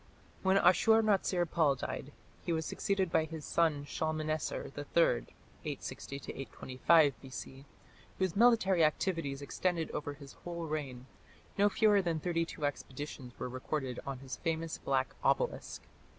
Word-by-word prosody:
When 190 0 +4
Ashur 220 +5 +5
natsir 190 -4 +2
pal 155 -4 +2
died, 125 - -5 0.3
he - - -2
was 160 -1 0
succeeded 190 0 0
by 160 - +3
his 160 -1 -7
son 155 -4 +1
Shalmaneser 155 0 -2
III 145 -4 +2 0.4
(860 140 - -5
825 135 +1 +2
B.C.), 135 0 -8 0.5
whose 185 -3 0
military 200 -6 +5
activities 155 -3 0
extended 170 +2 -1
over 145 -1 -4
his 140 -2 -12
whole 170 -1 -4
reign. 140 -5 -4 0.5
No 205 +1 +4
fewer 205 -1 +4
than 170 -3 -1
thirty 165 0 0
two 150 - -4
expeditions 135 -2 -5
were - - -3
recorded 130 0 -3
on 135 -1 -4
his 135 0 -7
famous 165 -1 -2
black 130 -1 0
obelisk. - - 0
155 Hz, 135 wpm, -33 LUFS, 140-175 Hz, 0.5 s, Ashur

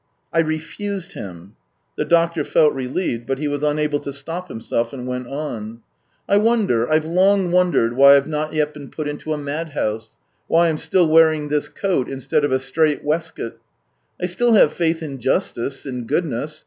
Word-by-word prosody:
" - - -44
I 165 - +2
refused 165 +4 -3
him." 90 +1 -9 0.4
The - - -1
doctor 170 -2 +2
felt 150 +1 +3
relieved, 130 -2 -3
but 135 - -1
he 150 +1 -2
was 145 0 -2
unable 150 0 0
to 140 - -6
stop 165 +6 -6
himself 115 -1 -3
and 125 -2 -6
went 125 -1 -4
on: 120 -6 -6 0.2
" - - -43
I 200 - +4
wonder, 205 - +2
I've 155 0 +3
long 185 +2 +3
wondered, 175 -10 +2
why 140 +1 +8
I've 140 - 0
not 155 0 -2
yet 150 -1 0
been 145 -2 -10
put 155 -2 -5
into 145 +1 -5
a 155 - 0
madhouse 145 -7 -4 0.2
— - - -46
why 170 0 +4
I'm 155 -1 -2
still 185 -2 +2
wearing 155 -2 +4
this 150 0 0
coat 185 -10 -1
instead 135 +2 -1
of 145 - +1
a 130 - +3
strait 150 +3 0
waistcoat? 160 -5 -3 0.6
I - - -1
still 230 +7 +1
have 215 - +5
faith 165 -1 0
in 140 -4 -6
justice, 120 +3 -2
in 125 -4 -5
goodness. 150 -1 -2
150 Hz, 190 wpm, -21 LUFS, 135-165 Hz, 0.6 s, why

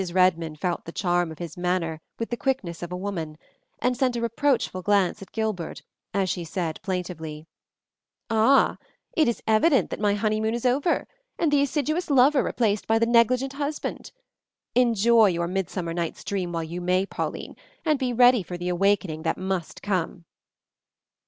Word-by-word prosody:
Redmond 170 -4 +2
felt 175 0 -2
the 165 - -7
charm 175 -2 0
of 160 - -9
his 170 -3 -7
manner 175 -3 -1 0.2
with 230 - -4
the - - +1
quickness 235 -11 -2
of 175 0 -6
a 180 - -3
woman, 170 -6 -4 0.4
and 250 - 0
sent 255 -1 +1
a 235 - -2
reproachful 235 -4 0
glance 200 -1 +2
at 195 - -11
Gilbert 215 -7 -3 0.3
as 195 -1 0
she 180 -1 -2
said 165 -1 -3
plaintively, 165 -5 -4 0.8
"Ah! 225 +4 +4 0.4
It 310 - +4
is 235 - -1
evident 245 +7 +3
that - - -4
my 205 -1 +2
honeymoon 215 +2 0
is 240 - -4
over, 275 +7 +1 0.3
and 325 -3 +1
the 290 -1 +4
assiduous 305 +5 -1
lover 275 +1 +5
replaced 215 -4 0
by 225 - +3
the 230 - +3
negligent 245 +3 +3
husband. 290 +1 -4 0.6
Enjoy 235 -2 +5
your 170 -2 0
midsummer 180 -2 -3
night's 170 -1 -3
dream 185 -3 -2
while 165 -1 -2
you 170 +3 -5
may, 185 +2 +2
Pauline, - - -5 0.3
and 305 -3 +2
be 255 -2 0
ready 245 -1 +5
for 180 0 -6
the 175 +1 -3
awakening 185 -3 +1
that 160 - -1
must 185 -3 -4
come." 185 -3 -2
200 Hz, 170 wpm, -25 LUFS, 175-240 Hz, 0.8 s, lover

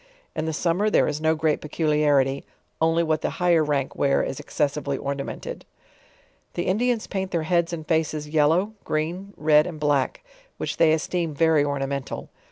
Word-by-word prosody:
In 155 - -2
the 160 - -1
summer 175 +6 +1
there - - +3
is 150 - -2
no 160 0 +3
great 155 -1 0
peculiarity, 150 -3 +1 0.4
only 165 +1 +3
what 155 -1 0
the - - 0
higher 175 -3 +3
rank 145 -3 -1
wear 140 -1 +2
is 135 - -4
excessively 145 -2 -1
ornamented. 140 0 -5 0.9
The 175 - -1
Indians 230 +4 +1
paint 190 -1 -3
their 170 -3 -1
heads 170 +1 +1
and 160 -3 -6
faces 155 -2 0
yellow, 160 +7 +2
green, 175 +6 -3
red 150 0 +4
and 165 -4 -7
black; 145 - 0 0.3
which - - -4
they 160 -1 +5
esioem 160 +1 -1
very 160 -1 +4
ornamental. 140 -1 -3
155 Hz, 165 wpm, -24 LUFS, 145-170 Hz, 0.9 s, they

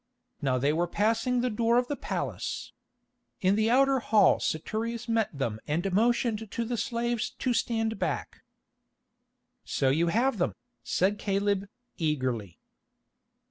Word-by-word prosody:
Now 135 -3 +1
they 140 +4 +2
were 170 +2 +1
passing 225 +6 +1
the 250 - +1
door 230 +2 +2
of 245 0 +2
the 290 - -2
palace. - - -4 0.7
In 190 +1 +3
the 220 +1 +2
outer 270 +2 +4
hall 220 -3 +4
Saturius 230 +8 -2
met 225 -2 +1
them 120 -7 -3
and 175 +6 -1
motioned 225 0 +1
to 235 - -2
the 240 +2 -2
slaves 235 -1 -1
to 255 - 0
stand 225 -1 0
back. - - -3 1.2
"So 135 - 0
you 165 +5 +2
have 230 +5 +1
them," 175 - 0 0.3
said 200 +3 +1
Caleb, 200 0 0 0.3
eagerly. 130 - -1
215 Hz, 140 wpm, -28 LUFS, 170-235 Hz, 1.2 s, outer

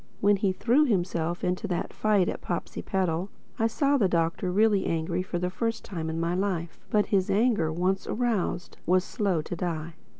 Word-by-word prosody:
When 205 0 +4
he 195 -1 +1
threw 245 +10 +3
himself 175 - -1
into 180 +4 -1
that 180 -3 -2
fight 205 -4 +2
at - - -3
Popsipetel, 180 +1 -2 0.3
I 225 - +3
saw 280 +5 +2
the 200 -7 +3
Doctor 170 +1 0
really 205 0 +3
angry 165 +2 -1
for 185 -1 -3
the 180 +1 -1
first 230 +4 -2
time 165 -6 -4
in 160 +1 -3
my 170 +1 0
life. 180 -3 -2
But 210 -1 +3
his 190 -2 +3
anger, 210 -7 +2
once 185 +4 0
aroused, 220 -7 -1
was 185 +1 +4
slow 190 -7 -1
to 175 - -5
die. 165 -2 -3
185 Hz, 180 wpm, -27 LUFS, 170-210 Hz, 0.3 s, When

